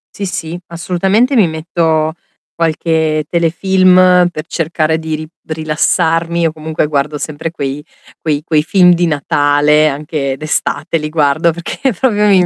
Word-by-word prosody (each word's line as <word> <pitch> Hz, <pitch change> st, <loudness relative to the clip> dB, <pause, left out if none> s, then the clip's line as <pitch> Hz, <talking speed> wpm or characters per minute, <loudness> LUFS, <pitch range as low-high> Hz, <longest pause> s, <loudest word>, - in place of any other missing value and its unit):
Sì, 200 Hz, -, -4 dB
sì, 175 Hz, -2 st, -5 dB
assolutamente, 190 Hz, +9 st, 0 dB
mi 210 Hz, -6 st, +4 dB
metto 160 Hz, -1 st, -1 dB, 0.4 s
qualche 160 Hz, -1 st, 0 dB
telefilm 180 Hz, +1 st, +3 dB
per 155 Hz, -1 st, -6 dB
cercare 160 Hz, -1 st, -1 dB
di 160 Hz, -1 st, -4 dB
ri 155 Hz, 0 st, -7 dB, 0.2 s
rilassarmi, 165 Hz, +2 st, 0 dB
o 160 Hz, -, -2 dB
comunque 155 Hz, -1 st, -3 dB
guardo 145 Hz, 0 st, -1 dB
sempre 160 Hz, +2 st, -4 dB
quei 140 Hz, -2 st, -4 dB, 0.4 s
quei 150 Hz, -2 st, -1 dB
quei 155 Hz, -3 st, +1 dB
film 180 Hz, 0 st, +4 dB
di 175 Hz, 0 st, +1 dB
Natale, 145 Hz, 0 st, +2 dB
anche 145 Hz, -1 st, -3 dB
d'estate 155 Hz, +2 st, -1 dB
li 150 Hz, -1 st, -4 dB
guardo, 155 Hz, +2 st, +2 dB
perché 190 Hz, -, -3 dB
proprio 210 Hz, 0 st, +1 dB
mi 185 Hz, -3 st, +4 dB
160 Hz, 140 wpm, -14 LUFS, 155-175 Hz, 0.4 s, mi